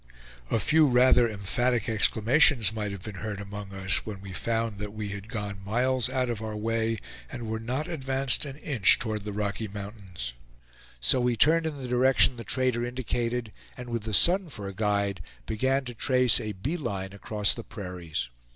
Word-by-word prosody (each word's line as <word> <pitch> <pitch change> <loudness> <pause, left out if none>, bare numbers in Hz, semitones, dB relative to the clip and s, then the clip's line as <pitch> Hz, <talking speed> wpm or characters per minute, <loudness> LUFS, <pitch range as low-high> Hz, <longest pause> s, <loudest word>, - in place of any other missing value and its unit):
A - - +2
few 155 +8 +4
rather 125 -1 +5
emphatic 110 +3 0
exclamations 115 +2 +4
might 105 -2 -3
have 100 -2 -7
been 105 -3 -7
heard 105 -2 -4
among 100 0 -7
us, 95 -1 +1
when 105 -3 -6
we 95 -1 -9
found 115 0 0
that 105 0 -5
we 105 -1 -4
had 100 +1 -6
gone 105 -4 -5
miles 125 +4 +1
out 130 -1 0
of 115 -3 -3
our 110 -1 -4
way, 115 +1 0 0.3
and 120 -2 -6
were 110 0 -2
not 130 +7 -3
advanced 135 -4 +1
an 140 -1 -6
inch 140 -9 +3
toward 110 -3 -3
the 105 - -3
Rocky 105 +2 -2
Mountains. 100 - -7 0.7
So - - +3
we 120 -1 +2
turned 160 +5 +4
in 150 -3 -5
the 130 - -5
direction 130 +1 +4
the 115 - -7
trader 125 -2 0
indicated, 120 -2 -2 0.2
and 125 -1 -7
with 115 -1 -2
the 110 0 -5
sun 180 - +4
for 105 -8 -7
a 100 - -6
guide, 100 -2 0 0.2
began 130 +5 0
to 120 - -6
trace 125 -1 +3
a 105 -1 -4
"bee 130 - -3
line" 100 - -4
across 105 0 -1
the - - -7
prairies. 90 - -5
110 Hz, 190 wpm, -27 LUFS, 100-125 Hz, 0.7 s, rather